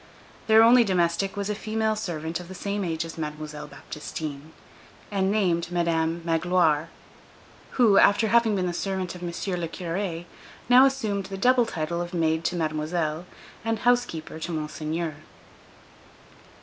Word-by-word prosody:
Their 220 0 +7
only 240 +1 +7
domestic 185 0 0
was 200 -1 -2
a 210 - -1
female 220 +1 -1
servant 165 -5 -4
of 175 - -9
the 190 - -9
same 200 +2 -3
age 165 -2 -2
as 165 0 -9
Mademoiselle 150 -1 -6
Baptistine, 150 0 -7 0.6
and 195 -1 +1
named 175 -5 +1
Madame 170 -1 0
Magloire, 165 -2 +2 0.9
who, 225 -6 +6
after 210 +2 +4
having 230 -2 +4
been 185 -2 0
the 175 - -2
servant 190 0 -3
of 180 - -10
M. 175 - -4
le 175 0 -3
Curé, 175 0 -4 0.4
now 250 +3 +8
assumed 215 -8 -2
the 195 - -6
double 245 +3 +4
title 170 -2 -3
of 175 +1 -5
maid 160 -1 +1
to 180 - 0
Mademoiselle 155 +1 -2 0.4
and 225 0 0
housekeeper 240 -10 0
to 175 - -4
Monseigneur. 155 0 -3
175 Hz, 150 wpm, -26 LUFS, 160-205 Hz, 0.9 s, now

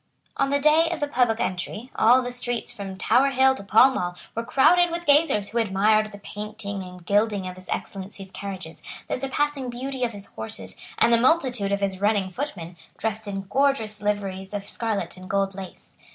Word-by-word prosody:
On 275 - +1
the 280 - +2
day 305 +3 +4
of 340 - -3
the 290 - 0
public 245 -5 +2
entry, 210 +7 -3
all 250 +3 +5
the 245 - -4
streets 245 -1 -1
from 195 -2 -7
Tower 250 +8 +3
Hill 265 0 +4
to 230 - -8
Pall 220 +6 +6
Mall 180 -8 -2 0.2
were 230 - -2
crowded 345 +9 +4
with 340 +1 -4
gazers 285 -9 +3
who 235 - -1
admired 215 +1 +2
the 205 - -10
painting 205 0 -6
and 180 -1 -10
gilding 205 -1 +1
of 180 - -6
his 185 0 -15
Excellency's 195 0 -6
carriages, 190 -5 -7 0.3
the - - -1
surpassing 270 0 -1
beauty 255 +2 -4
of 240 - +1
his 200 -1 -5
horses, 95 - -6 0.2
and 235 - +4
the 230 - +4
multitude 250 -8 +2
of 200 0 0
his 195 -1 -2
running 205 -2 +1
footmen, 180 - -5 0.2
dressed 220 -1 -2
in 195 -1 -3
gorgeous 220 -1 0
liveries 200 -1 -2
of 200 0 -5
scarlet 220 -4 -3
and 185 0 -11
gold 195 0 +1
lace. 190 -1 -10
215 Hz, 195 wpm, -25 LUFS, 195-260 Hz, 0.3 s, Pall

